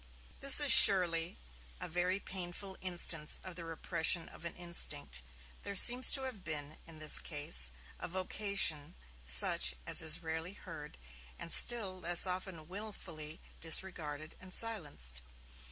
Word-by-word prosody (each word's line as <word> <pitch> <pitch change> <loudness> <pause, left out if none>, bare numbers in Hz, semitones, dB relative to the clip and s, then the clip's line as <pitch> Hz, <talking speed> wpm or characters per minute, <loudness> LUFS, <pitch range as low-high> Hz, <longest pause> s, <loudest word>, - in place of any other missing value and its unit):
This 275 +1 +3
is, 290 -2 +2
surely, 170 -3 +6 0.4
a - - -7
very 180 +3 -4
painful 190 0 -8
instance 170 -4 -1
of 185 - -11
the 170 0 -11
repression 165 +1 -1
of - - -15
an 170 - -8
instinct. 70 - -3 0.4
There 200 - -9
seems 245 +6 +5
to 270 - -1
have 250 -8 -9
been, 150 -1 -8
in 165 -1 -14
this 155 -1 +4
case, 145 - -2 0.3
a - - -6
vocation 185 -4 -3 0.3
such 65 0 +4
as - - +2
is 160 +2 +1
rarely 160 +3 -7
heard, 165 -7 -13 0.4
and 170 - -2
still 200 -6 +5
less 175 +1 +5
often 180 -3 -6
wilfully 175 -6 -8 0.2
disregarded 160 -3 -3
and 185 0 -16
silenced. 145 - -3
170 Hz, 135 wpm, -31 LUFS, 155-190 Hz, 0.4 s, surely